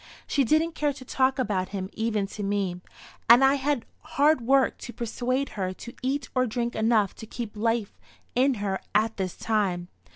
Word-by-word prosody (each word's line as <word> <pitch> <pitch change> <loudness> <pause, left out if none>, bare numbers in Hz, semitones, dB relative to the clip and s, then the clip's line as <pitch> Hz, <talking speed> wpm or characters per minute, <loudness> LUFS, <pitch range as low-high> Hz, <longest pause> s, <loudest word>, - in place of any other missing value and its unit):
She 280 - +2
didn't 315 +6 +2
care 295 -2 0
to 265 -1 -11
talk 260 +1 +1
about 200 -7 -1
him 195 -2 -4
even 220 -2 0
to 210 - -6
me, 195 -3 -1 0.5
and 240 +3 +9
I 270 - +5
had 280 -3 0 0.3
hard 295 0 +5
work 265 +3 +3
to 240 - -7
persuade 250 +4 -2
her 185 -2 -3
to 235 +5 -10
eat 265 +1 -1
or 255 -1 +2
drink 235 +1 -2
enough 220 -3 +2
to 220 - -9
keep 230 -1 -6
life 225 -1 -1 0.3
in 260 +2 +3
her 200 -2 -2 0.2
at 220 +1 +2
this 185 -3 -3
time. 190 -5 -1
235 Hz, 185 wpm, -26 LUFS, 205-265 Hz, 0.5 s, and